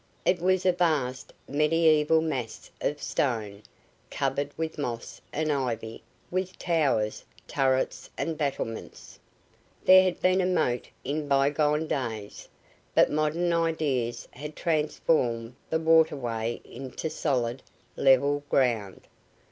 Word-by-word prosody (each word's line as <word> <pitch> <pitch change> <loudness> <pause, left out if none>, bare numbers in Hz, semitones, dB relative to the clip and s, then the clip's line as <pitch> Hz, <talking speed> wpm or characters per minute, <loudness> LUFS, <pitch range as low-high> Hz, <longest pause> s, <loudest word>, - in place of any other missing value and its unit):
It 180 -2 +2
was 185 +1 +2
a 185 - +6
vast, 155 -8 0 0.2
mediaeval 155 +1 +3
mass 130 -8 -4
of 145 - -1
stone, 110 -9 -2 0.5
covered 140 - -1
with 160 -1 -3
moss 120 -5 -5
and 155 0 -1
ivy, 120 -5 -3 0.3
with 185 +1 -2
towers, 140 -11 0 0.2
turrets 130 -1 0
and 165 - -2
battlements. 140 -7 -4 0.7
There 185 0 +9
had 185 -1 0
been 185 +1 +3
a 180 - +1
moat 155 -10 0
in 145 +2 -2
bygone 145 +2 +2
days, 115 -8 -4 0.5
but - - +5
modern 155 +3 +1
ideas 155 -8 0
had 150 +3 -8
transformed 150 -7 0 0.2
the 160 - +1
waterway 135 -8 +2
into 130 +4 -6
solid, 130 -5 -1 0.3
level 140 +2 +3
ground. 115 -9 +1
145 Hz, 115 wpm, -27 LUFS, 125-160 Hz, 0.7 s, There